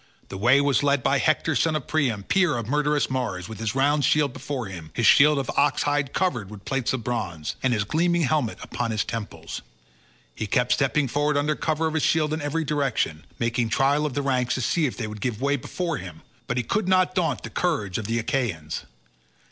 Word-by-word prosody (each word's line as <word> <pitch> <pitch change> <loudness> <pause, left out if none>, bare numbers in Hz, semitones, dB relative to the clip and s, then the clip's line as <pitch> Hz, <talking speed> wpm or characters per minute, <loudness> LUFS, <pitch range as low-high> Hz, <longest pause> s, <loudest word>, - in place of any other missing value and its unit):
The 95 - -6
way 125 +6 +5
was 140 -1 +2
led 140 -2 +2
by - - +2
Hector - - +1
son 160 -1 +2
of 150 - -2
Priam, 130 -10 0
peer 175 - +2
of 115 - -3
murderous 150 +2 +1
Mars, 110 -9 -3
with 110 -2 -8
his 115 +1 -2
round 145 +2 +2
shield 145 -1 +2
before 135 -1 -4
him—his 95 +3 -4
shield 150 +3 +6
of 135 -2 -2
ox 145 - +2
hides 145 -2 0
covered 125 - -1
with 105 -1 -11
plates 130 -2 -1
of 130 -3 -3
bronze—and 115 - -2
his 110 -4 +1
gleaming 170 +8 +1
helmet 145 -5 0
upon 120 - -3
his 110 -1 -1
temples. 115 -3 -6 0.7
He 110 - -4
kept 125 +4 +1
stepping 140 +1 +2
forward 145 +3 +1
under 150 +1 +1
cover 160 0 -1
of 160 - -1
his 160 - 0
shield 155 0 +2
in 155 - -2
every 155 +2 -1
direction, 135 - -1
making 115 0 0
trial 140 +5 +2
of 135 - -6
the 145 - -1
ranks 125 -3 +1
to 130 - -2
see 155 +5 +1
if 125 - -6
they 120 - -3
would 105 -1 -7
give 120 -4 -2
way 140 +1 +1
before 165 +3 -3
him, 85 -4 -10 0.2
but 125 - -2
he 125 - +1
could 205 - -1
not 185 -1 +3
daunt 180 -3 0
the - - -7
courage 135 - -1
of 105 - -5
the 115 +1 0
Achaeans. 110 - -2
135 Hz, 215 wpm, -25 LUFS, 115-150 Hz, 0.7 s, shield